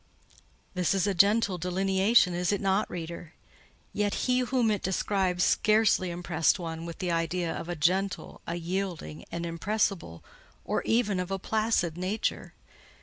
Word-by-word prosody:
This 180 +1 +1
is 190 -1 +1
a 200 - +1
gentle 200 0 +3
delineation, 190 +3 +3
is 175 +1 0
it 205 - 0
not, 195 +1 +1
reader? 170 -1 -7 0.6
Yet 205 -1 0
he 250 0 +2
whom 250 -3 +1
it 205 - -1
describes 190 -1 0
scarcely 215 -4 +3
impressed 170 -1 +1
one 165 -2 -6
with 170 - -7
the 180 -2 -2
idea 165 +1 -1
of 170 - -6
a 175 - -2
gentle, 185 +5 -1
a 170 - -2
yielding, 170 - -4
an 170 0 -3
impressible, 170 - -2 0.4
or - - 0
even 220 -5 +1
of 180 0 -3
a 195 - -1
placid 205 -5 0
nature. 190 +4 -2
185 Hz, 150 wpm, -28 LUFS, 170-205 Hz, 0.6 s, gentle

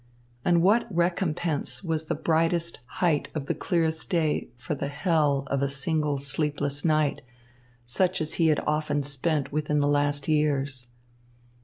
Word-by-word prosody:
And 170 -1 +3
what 215 +6 +4
recompense 170 -3 -1
was 160 -2 -2
the - - -1
brightest 165 +1 +1 0.2
height 160 -5 +2
of 150 -3 -3
the - - 0
clearest 160 -2 -1
day 160 -4 +1
for 120 +3 -4
the 140 -1 -3
hell 145 -2 +1
of 140 -1 +1
a 140 - +1
single 150 +1 0
sleepless 145 0 -1
night, 155 -3 +2 0.6
such 185 +10 +1
as 155 -1 -2
he 165 - +2
had 155 -2 +3
often 150 -1 0
spent 145 +1 -1
within 150 0 0
the 145 - +2
last 145 -1 +1
years. 140 -4 0
150 Hz, 150 wpm, -26 LUFS, 145-165 Hz, 0.6 s, what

